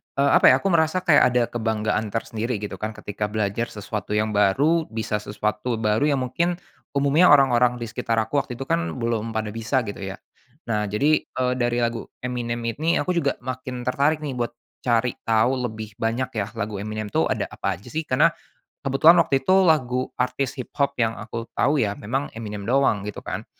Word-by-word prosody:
eee, 140 Hz, 0 st, +3 dB
apa -, -, +6 dB
ya, -, -, +5 dB
aku 195 Hz, -, +1 dB
merasa 170 Hz, +2 st, +2 dB
kayak 155 Hz, -5 st, +6 dB
ada 125 Hz, -, +4 dB
kebanggaan 110 Hz, -2 st, -1 dB
tersendiri 115 Hz, +2 st, -3 dB
gitu 105 Hz, 0 st, -6 dB
kan 110 Hz, 0 st, -4 dB
ketika 105 Hz, 0 st, -4 dB
belajar 105 Hz, +2 st, -1 dB
sesuatu 105 Hz, 0 st, -5 dB
yang 110 Hz, 0 st, +1 dB
baru, 140 Hz, +12 st, +2 dB
bisa 110 Hz, -1 st, -2 dB
sesuatu 105 Hz, +3 st, -2 dB
baru, 110 Hz, +5 st, +1 dB
yang 140 Hz, -3 st, +1 dB
mungkin 170 Hz, +8 st, 0 dB, 0.4 s
umumnya 140 Hz, +6 st, +4 dB
orang-orang 125 Hz, -4 st, +5 dB
di 120 Hz, -, -6 dB
sekitar 115 Hz, +1 st, -1 dB
aku 145 Hz, +6 st, 0 dB
waktu 125 Hz, -3 st, -5 dB
itu 135 Hz, -, -5 dB
kan 85 Hz, -10 st, -1 dB
belum 115 Hz, -1 st, -2 dB
pada 110 Hz, -1 st, -2 dB
bisa, 115 Hz, +4 st, -1 dB
gitu 100 Hz, -2 st, -6 dB
ya. 95 Hz, -, -5 dB, 0.6 s
Nah, 105 Hz, -1 st, 0 dB
jadi, 145 Hz, +10 st, +2 dB
eee, 125 Hz, 0 st, -1 dB
dari 120 Hz, 0 st, +1 dB
lagu 115 Hz, 0 st, -2 dB, 0.2 s
Eminem 120 Hz, -1 st, -3 dB
ini 150 Hz, +9 st, 0 dB
aku 180 Hz, -, -1 dB
juga 165 Hz, -6 st, +1 dB
makin 130 Hz, -1 st, -5 dB
tertarik 145 Hz, +5 st, +1 dB
nih 135 Hz, -4 st, -4 dB
buat 120 Hz, 0 st, -2 dB, 0.2 s
cari 120 Hz, 0 st, +1 dB, 0.2 s
tahu 125 Hz, +3 st, +2 dB
lebih 110 Hz, -2 st, -9 dB
banyak 120 Hz, +3 st, -1 dB
ya 100 Hz, -, -1 dB
lagu 105 Hz, -2 st, -3 dB
Eminem 110 Hz, 0 st, -5 dB
tu 80 Hz, -, +2 dB
ada -, -, -1 dB
apa 100 Hz, -, -2 dB
aja 100 Hz, +7 st, -16 dB
sih, 160 Hz, 0 st, -3 dB
karena 150 Hz, +6 st, +4 dB, 0.5 s
kebetulan 145 Hz, +5 st, +6 dB
waktu 135 Hz, -3 st, +1 dB
itu 190 Hz, +4 st, +5 dB
lagu 130 Hz, -7 st, +2 dB
artis 125 Hz, +1 st, -1 dB
hiphop 140 Hz, +3 st, -2 dB
yang 115 Hz, -1 st, +1 dB
aku 115 Hz, +1 st, -6 dB
tahu 145 Hz, +3 st, +2 dB
ya, 105 Hz, -4 st, 0 dB
memang 130 Hz, +8 st, -2 dB
Eminem 105 Hz, -3 st, -6 dB
doang, 130 Hz, -5 st, +2 dB
gitu 105 Hz, -, -7 dB
kan. -, -, -5 dB
120 Hz, 190 wpm, -23 LUFS, 110-135 Hz, 0.6 s, apa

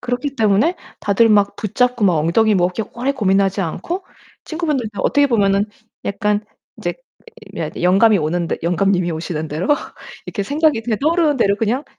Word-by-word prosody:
그렇기 250 Hz, +3 st, -3 dB
때문에 220 Hz, -, +2 dB, 0.2 s
다들 225 Hz, +3 st, +3 dB
막 205 Hz, -1 st, +3 dB
붙잡고 245 Hz, +2 st, 0 dB
막 180 Hz, -4 st, +4 dB
엉덩이 210 Hz, +8 st, +2 dB
뭐 180 Hz, -2 st, +3 dB
그렇게 205 Hz, +4 st, -5 dB
오래 255 Hz, +4 st, -1 dB
고민하지 195 Hz, -4 st, +1 dB
않고 260 Hz, -, -4 dB, 0.4 s
친구분들도 280 Hz, -, -3 dB
어떻게 285 Hz, 0 st, +3 dB
보면은 200 Hz, -5 st, +2 dB, 0.4 s
약간 210 Hz, +1 st, -1 dB, 0.3 s
인제 -, -, -3 dB
이 -, -, -10 dB, 0.6 s
며 -, -, -2 dB
영감이 195 Hz, +5 st, +5 dB
오는 170 Hz, +1 st, -1 dB
듯 -, -, -2 dB
영감님이 180 Hz, +1 st, +1 dB
오시는 160 Hz, -1 st, -4 dB
대로 155 Hz, +5 st, -3 dB, 0.6 s
이렇게 205 Hz, -, -4 dB
생각이 290 Hz, +2 st, +1 dB
그냥 225 Hz, -1 st, -2 dB
떠오르는 315 Hz, 0 st, +2 dB
대로 200 Hz, -5 st, +2 dB
그냥 230 Hz, +7 st, -1 dB
210 Hz, 380 characters per minute, -19 LUFS, 190-250 Hz, 0.6 s, 영감이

